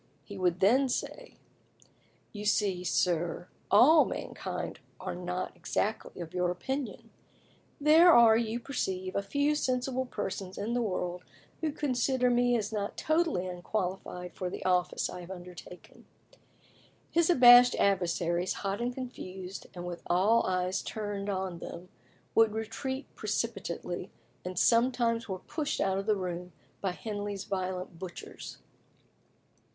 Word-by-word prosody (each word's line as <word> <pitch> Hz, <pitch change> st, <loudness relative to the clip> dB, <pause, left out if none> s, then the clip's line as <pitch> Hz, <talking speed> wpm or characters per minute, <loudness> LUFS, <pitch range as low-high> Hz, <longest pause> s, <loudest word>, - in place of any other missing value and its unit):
He 205 Hz, -, -10 dB
would 180 Hz, -2 st, 0 dB
then 255 Hz, +7 st, +4 dB
say, -, -, -4 dB, 1.0 s
"You 210 Hz, -1 st, -6 dB
see, 200 Hz, -3 st, +1 dB
sir, 175 Hz, 0 st, 0 dB, 0.2 s
all 295 Hz, +10 st, +7 dB
mankind -, -, -5 dB, 0.2 s
are -, -, -4 dB
not 180 Hz, +1 st, -4 dB
exactly 215 Hz, -1 st, -2 dB
of 160 Hz, -, -12 dB
your 180 Hz, -1 st, +1 dB
opinion; 265 Hz, +9 st, -4 dB, 0.7 s
there 315 Hz, +4 st, +7 dB
are, 235 Hz, -5 st, +7 dB
you 230 Hz, 0 st, 0 dB
perceive, 190 Hz, -8 st, -3 dB
a 200 Hz, -, +1 dB
few 285 Hz, +9 st, +1 dB
sensible 260 Hz, -2 st, -1 dB
persons 195 Hz, -4 st, -5 dB
in 215 Hz, +4 st, -2 dB
the 245 Hz, -, +1 dB
world 180 Hz, -4 st, -2 dB, 0.4 s
who 315 Hz, -2 st, -1 dB
consider 260 Hz, -3 st, +1 dB
me 245 Hz, 0 st, +3 dB
as 215 Hz, 0 st, -3 dB
not 205 Hz, -1 st, -3 dB
totally 315 Hz, -, +1 dB
unqualified 180 Hz, -1 st, -4 dB
for 185 Hz, -, -3 dB
the -, -, -7 dB
office 180 Hz, -1 st, +1 dB
I 180 Hz, -, -7 dB
have 175 Hz, -, -11 dB
undertaken." 180 Hz, -1 st, -11 dB, 1.0 s
His 335 Hz, 0 st, +3 dB
abashed 245 Hz, -5 st, +8 dB
adversaries, 175 Hz, -2 st, +1 dB
hot 200 Hz, +2 st, -3 dB
and 240 Hz, +1 st, 0 dB
confused, 190 Hz, -7 st, -7 dB
and 175 Hz, 0 st, -6 dB
with 175 Hz, -1 st, -6 dB
all 205 Hz, +7 st, +3 dB
eyes 185 Hz, 0 st, 0 dB
turned 205 Hz, -2 st, -4 dB
on 190 Hz, -3 st, -3 dB
them, 175 Hz, +2 st, -8 dB, 0.4 s
would 225 Hz, -1 st, +4 dB
retreat 225 Hz, +5 st, -4 dB
precipitately, 200 Hz, -5 st, -3 dB, 0.3 s
and 180 Hz, 0 st, -6 dB
sometimes 235 Hz, 0 st, +2 dB
were 190 Hz, -, -2 dB
pushed 300 Hz, -, -3 dB
out 190 Hz, 0 st, +1 dB
of 195 Hz, -, -5 dB
the 215 Hz, -, +4 dB
room 180 Hz, -1 st, -5 dB, 0.3 s
by 195 Hz, -, 0 dB
Henley's 205 Hz, -1 st, -4 dB
violent 185 Hz, -2 st, -4 dB
butchers. 185 Hz, -2 st, -8 dB
200 Hz, 135 wpm, -30 LUFS, 180-245 Hz, 1.0 s, abashed